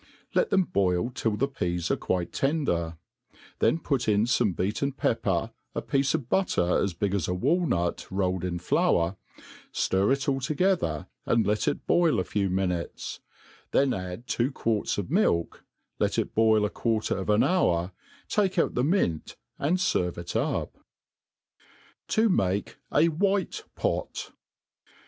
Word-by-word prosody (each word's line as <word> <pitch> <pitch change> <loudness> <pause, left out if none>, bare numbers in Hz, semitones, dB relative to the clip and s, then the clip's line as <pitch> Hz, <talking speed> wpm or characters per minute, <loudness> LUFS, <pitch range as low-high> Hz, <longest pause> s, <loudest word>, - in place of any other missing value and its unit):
Liet 485 - +2
them 190 - +4
boil 95 - 0
till 110 -3 -1
the 135 - +1
peas 90 -10 -2
are - - +3
quite 90 -2 -2
ten^; 85 - 0 0.6
then - - +3
put 135 -7 -1
in 105 0 +3
fome 115 -5 +1
beaten 105 +9 -1
pepper, - - 0 0.2
a - - -1
piece 140 +2 +1
of 140 -7 -3
butter 110 - +2
as 95 -3 -1
big 100 +3 -1
as 100 -6 0
a 90 - -1
walnut, 130 - 0
rolled 95 -2 -1
in 90 -1 -2
flour, 85 +1 +1 0.6
ftir 95 +4 +1
it 135 0 0
all 135 -1 +1
together, 145 - 0 0.2
and 115 -1 +3
let 105 0 0
it - - -1
boil 170 - +3
a - - +1
few 100 +2 -1
miniiteff; 90 -2 -2 0.5
then 135 -1 +3
add 90 +4 -5
two 125 +2 0
quarts 115 -5 -1
of 100 +3 -4
milk, 155 - +1 0.4
iet - - +1
it - - -1
boil 110 -1 +4
a 105 - -2
quarter 110 -2 0
of 95 +1 -4
an 105 +1 +4
hour, 90 - +2 0.4
take 195 -3 +1
out 165 - +2
the 125 - +1
mint, 140 - 0 0.2
and 160 +6 +2
fenre 90 - 0
it 85 - -6
n{^« - - -1 1.4
ta 220 +1 +3
make 100 - 0
a 150 - +4
fflnU 200 - 0
Pot. - - -2
105 Hz, 155 wpm, -27 LUFS, 90-145 Hz, 1.4 s, them